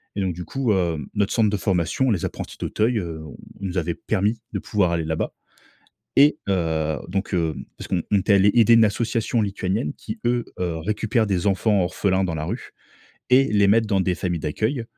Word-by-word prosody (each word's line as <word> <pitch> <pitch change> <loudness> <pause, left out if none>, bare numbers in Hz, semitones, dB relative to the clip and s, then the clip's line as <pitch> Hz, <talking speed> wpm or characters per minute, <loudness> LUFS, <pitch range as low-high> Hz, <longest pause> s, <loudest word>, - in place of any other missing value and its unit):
et 100 - -1
donc 95 -2 0
du 90 +2 -6
coup 125 +4 0
hem, 85 -7 -1
notre 100 -1 0
centre 110 -3 +3
de 105 - 0
formation, 95 +7 +1
Les 95 -6 0
Apprentis - - -6
d'Auteuil, 115 +2 0
heu, 85 -4 -5 0.4
nous 95 -2 -3
avait 85 -1 0
permis 105 +7 -1
de - - -2
pouvoir 100 -5 +1
aller 85 -2 -1
là-bas, 80 0 -2 0.8
et 145 +2 +6
heu 80 -5 0
donc 95 +3 -3
hem 80 -3 -1
parce - - -9
qu'on 90 -3 0
on 100 - +5
était 100 +2 +3
allé 100 +1 +5
aider 115 -1 +6
une 115 -1 +7
association 115 +2 0
lituanienne, 95 -4 -2
qui 110 +1 -8
eux, 120 0 +1 0.2
heu, 85 -2 -1
récupèrent 110 +6 0
des 95 -2 -1
enfants 100 +1 +2
orphelins 95 +2 0
dans 85 -3 -2
la 75 - -3
rue, 110 +10 -5 0.6
et 130 +2 +6
les 100 -1 +4
mettent 110 +2 +4
dans 100 -3 +1
des 90 -1 +1
familles 90 -3 -2
d'accueil. 110 - -1
100 Hz, 200 wpm, -23 LUFS, 85-110 Hz, 0.8 s, une